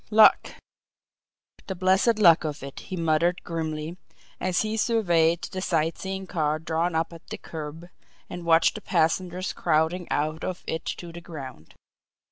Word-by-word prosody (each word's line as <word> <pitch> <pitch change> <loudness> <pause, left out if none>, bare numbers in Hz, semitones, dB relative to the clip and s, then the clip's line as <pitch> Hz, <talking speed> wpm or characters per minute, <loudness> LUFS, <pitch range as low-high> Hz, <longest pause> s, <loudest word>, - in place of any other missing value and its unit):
"Luck! 215 0 +6 1.1
The 190 - -3
blessed 190 +5 +3
luck 170 -6 +6
of 150 -3 -4
it!" 140 0 -7
he 185 - -7
muttered 165 +2 +1
grimly, 160 0 -4 0.4
as 185 -1 +1
he 215 0 -2
surveyed 175 -8 +2
the 185 - -4
sight 165 -3 0
seeing 190 0 -4
car 155 -4 0
drawn 160 +1 -1
up 165 +1 0
at 165 - -13
the - - -6
curb, 160 +1 -8 0.4
and 175 - -7
watched 165 -1 +4
the - - -7
passengers 180 +2 0
crowding 165 +2 +1
out 155 +2 -1
of 180 -1 -4
it 160 +1 -3
to 175 -1 -5
the 170 +1 -9
ground. 130 - -10
170 Hz, 155 wpm, -26 LUFS, 160-185 Hz, 1.1 s, Luck